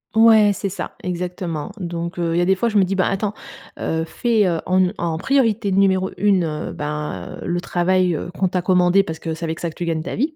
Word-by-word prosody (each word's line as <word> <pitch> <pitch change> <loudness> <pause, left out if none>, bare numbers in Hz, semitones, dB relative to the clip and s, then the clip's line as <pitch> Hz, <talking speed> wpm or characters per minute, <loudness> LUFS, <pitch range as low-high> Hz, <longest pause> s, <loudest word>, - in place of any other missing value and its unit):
Ouais, 220 -2 +6
c'est 200 - -3
ça, 195 - -5
exactement. 175 -3 -4
Donc 170 0 -4
heu, 165 -1 0
il - - +1
y - - +3
a 175 - +2
des 190 - +3
fois 235 +5 0
je 215 - +1
me 200 - +6
dis: 190 +1 -1
«Ben 190 - +2
attends, 200 +1 -1 0.5
heu, 160 0 -1
fais, 215 +5 +1
heu, 170 -3 0
en 185 +1 +2
n 185 +1 +2
en 165 -2 -2
priorité 225 -2 +1
numéro 190 -1 +2
1 180 -7 +1
ben 150 -11 -5
heu, - - -7
le 175 0 -1
travail, 180 0 +1
heu, 170 - -5
qu'on 190 -1 +1
t'a 180 0 -1
commandé, 180 +1 +4
parce 160 -3 -6
que 165 - -4
c'est 165 +1 -5
avec 160 0 -4
ça 170 - -1
que 155 - -13
tu 175 - -4
gagnes 165 -2 -1
ta 185 - -4
vie. 300 +7 -1
180 Hz, 250 wpm, -21 LUFS, 170-195 Hz, 0.5 s, Ouais